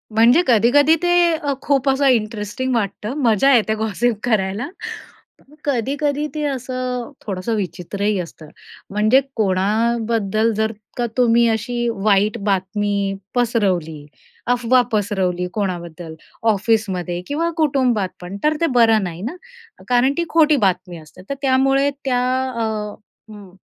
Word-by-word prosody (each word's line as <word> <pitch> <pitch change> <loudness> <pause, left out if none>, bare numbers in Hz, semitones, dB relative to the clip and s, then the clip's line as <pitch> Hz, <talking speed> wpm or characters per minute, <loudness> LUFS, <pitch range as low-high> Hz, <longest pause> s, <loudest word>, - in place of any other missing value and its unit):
म्हणजे 240 +8 +6
कधी-कधी 260 +7 +5
ते 350 - +2 0.3
अ, 290 -3 -2
खूप 275 -1 +1
असं 270 +1 +2
इंटरेस्टिंग 230 +1 0
वाटतं, 210 +1 -2
मजा 230 +3 +4
येते 220 -2 +2
गॉसिप 220 +2 0
करायला. 215 +1 0 1.0
कधी-कधी 285 +3 -1
ते 305 - -2
असं 255 -2 -3
थोडंसं 200 +3 -2
विचित्रही 200 +2 -2
असतं, 165 -2 -8 0.4
म्हणजे 215 +6 +3
कोणाबद्दल 220 +2 +1
जर 220 +1 0 0.3
का 240 - 0
तुम्ही 235 -1 +4
अशी 240 +2 -1
वाईट 205 +1 +2
बातमी 200 0 -1 0.2
पसरवली, 185 -11 0 0.4
अफवा 245 +1 +3
पसरवली 190 -4 0
कोणाबद्दल 175 -5 -4 0.4
ऑफिसमध्ये 195 -5 -1
किंवा 325 +4 -1
कुटुंबात 255 - +1
पण 180 +3 -7
तर 305 +1 +2
ते - - +4
बरं 225 -3 +5
नाही 175 -1 -5
ना, 245 - -4 0.5
कारण 250 +2 +3
ती 340 - +1
खोटी 315 -2 +4
बातमी 180 -1 -1
असते. 155 +3 -14
तर 280 - -2
त्यामुळे 270 +1 +3 0.2
त्या 250 -2 +1 0.3
अ, 235 -2 -3 0.7
हं, 200 -3 -12
225 Hz, 125 wpm, -20 LUFS, 195-255 Hz, 1.0 s, म्हणजे